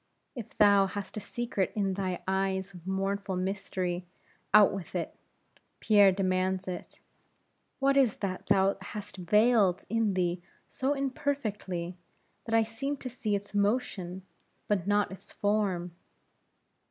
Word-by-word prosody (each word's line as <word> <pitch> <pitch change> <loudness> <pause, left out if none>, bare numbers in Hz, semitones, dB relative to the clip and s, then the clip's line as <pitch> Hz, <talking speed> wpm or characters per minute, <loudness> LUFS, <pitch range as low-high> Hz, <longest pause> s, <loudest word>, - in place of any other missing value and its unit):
If 240 -6 -9
thou 200 -2 +6
hast 195 -1 -6
a - - -2
secret 210 -2 -2
in 195 -3 0
thy 185 -2 -3
eyes 190 0 -1
of 175 0 -12
mournful 195 0 -1
mystery, 185 -1 -2 0.4
out 210 0 +7
with 195 -3 -7
it; - - -3 0.6
Pierre 205 -3 +6
demands 185 0 0
it; 180 -1 -6 0.8
what 275 0 +2
is 260 -6 +3
that 185 -2 -4
thou 195 +1 +3
hast 205 +1 -7
veiled 210 +1 +3
in 220 -2 +1
thee 175 -1 0 0.3
so 270 +2 -1
imperfectly, 215 -11 -2 0.5
that 225 - 0
I 225 - +5
seem 250 +6 -3
to 255 - -6
see 235 -4 -1
its 200 +1 -5
motion, 200 -4 -1 0.4
but 195 -3 0
not 205 -1 +2
its 190 - -10
form? 200 -4 0
200 Hz, 135 wpm, -29 LUFS, 185-215 Hz, 0.8 s, out